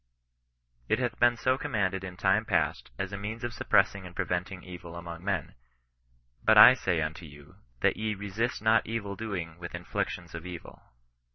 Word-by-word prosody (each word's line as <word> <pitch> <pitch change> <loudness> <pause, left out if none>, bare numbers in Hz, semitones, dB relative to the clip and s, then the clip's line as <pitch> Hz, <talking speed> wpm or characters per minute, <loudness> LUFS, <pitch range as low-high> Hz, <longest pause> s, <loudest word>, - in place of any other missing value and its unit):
It - - +3
hath - - -2
been 120 0 +4
so 130 +2 +1
commanded 100 -9 -1
in 90 -1 -7
time 95 +3 +3
past, 85 -8 0
as 95 +1 -4
a - - -3
means 110 +4 -5
of 120 - -3
suppressing 100 -1 +2
and 90 -1 -11
preventing 90 +1 -2
evil 90 -1 -9
among 85 0 -8
men; 95 -6 -2 0.4
" - - -39
but 110 0 +5
I 110 +4 +11
say 90 -10 0
unto 80 +2 -5
you, 75 +5 -15 0.2
that - - +3
ye 110 -1 -1
resist 105 +5 -3
not 110 0 +4
evil 105 -3 -3
doing 90 -7 -5
with 85 0 -6
inflictions 90 -2 -4
of 85 -1 -6
evil." 90 -2 -9
95 Hz, 180 wpm, -29 LUFS, 85-110 Hz, 0.4 s, I